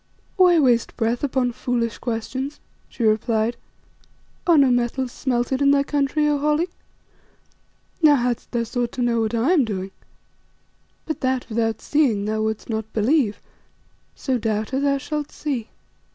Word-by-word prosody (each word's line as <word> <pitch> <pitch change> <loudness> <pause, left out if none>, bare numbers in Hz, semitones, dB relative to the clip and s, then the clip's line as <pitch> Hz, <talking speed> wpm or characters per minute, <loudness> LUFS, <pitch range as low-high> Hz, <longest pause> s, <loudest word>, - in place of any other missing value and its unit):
"Why 360 -3 +5
waste 245 -5 +2
breath 230 +2 0
upon 255 -3 +1
foolish 235 -1 -2
questions?" 260 +4 -4 0.3
she 240 - -5
replied. 220 +1 +1 0.9
"Are 340 -2 +6
no 275 -3 +5
metals 245 +1 0
smelted 255 +1 -1
in 280 - +5
thy 280 0 +4
country, 290 +1 0
O 295 -1 +1
Holly? 300 +4 +1 1.3
Now 300 -2 +7
hadst 245 -2 -1
thou 235 -2 0
sought 240 +1 -3
to 250 - -2
know 235 -1 +1
what 220 +1 -1
I 235 +8 +2
am 330 -7 +4
doing 195 -4 -4 1.1
But 315 - -4
that, 260 -1 0
without 225 -1 -1
seeing, 250 -10 +1
thou 215 +1 -1
wouldst 220 0 -2
not 220 -1 -4
believe, 225 0 +2 0.8
so, 260 -3 -1
Doubter, 220 +4 -1
thou 280 0 +2
shalt 295 +1 -4
see." 260 -7 -4
245 Hz, 150 wpm, -22 LUFS, 225-280 Hz, 1.3 s, Now